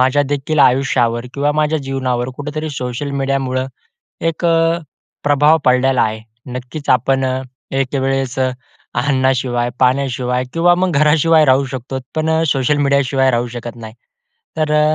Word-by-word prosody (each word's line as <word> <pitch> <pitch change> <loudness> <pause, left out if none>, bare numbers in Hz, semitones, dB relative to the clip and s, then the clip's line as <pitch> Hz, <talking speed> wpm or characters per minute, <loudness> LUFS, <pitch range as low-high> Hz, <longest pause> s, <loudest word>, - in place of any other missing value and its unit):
माझ्या 130 +3 +3
देखील 145 +2 -2
आयुष्यावर 125 -3 +2
किंवा 145 +1 +1
माझ्या 155 +1 +1
जीवनावर 130 -2 -2
कुठेतरी 150 +2 -4
सोशल 130 +1 -4
मीडियामुळं 135 -1 -1 0.5
एक 165 +1 -2
अ, 165 0 +2 0.5
प्रभाव 145 +2 +4
पडलेला 125 0 +3
आहे. 110 0 -1 0.3
नक्कीच 125 +4 -7
आपण 130 +2 +2 0.5
एकवेळेस 135 0 -1
अन्नाशिवाय, 130 -1 -1
पाण्याशिवाय 125 -1 +1
किंवा 175 +1 +4
मग 185 0 0
घराशिवाय 155 +2 +4
राहू 135 0 +3
शकतोत 130 0 -5
पण 160 0 0 0.2
सोशल 135 +2 +1
मीडियाशिवाय 140 -1 +2
राहू 120 0 0
शकत 120 0 -7
नाही. 110 -1 -10 0.6
तर 155 -1 0
अ, 150 0 +3
135 Hz, 130 wpm, -17 LUFS, 125-150 Hz, 0.6 s, प्रभाव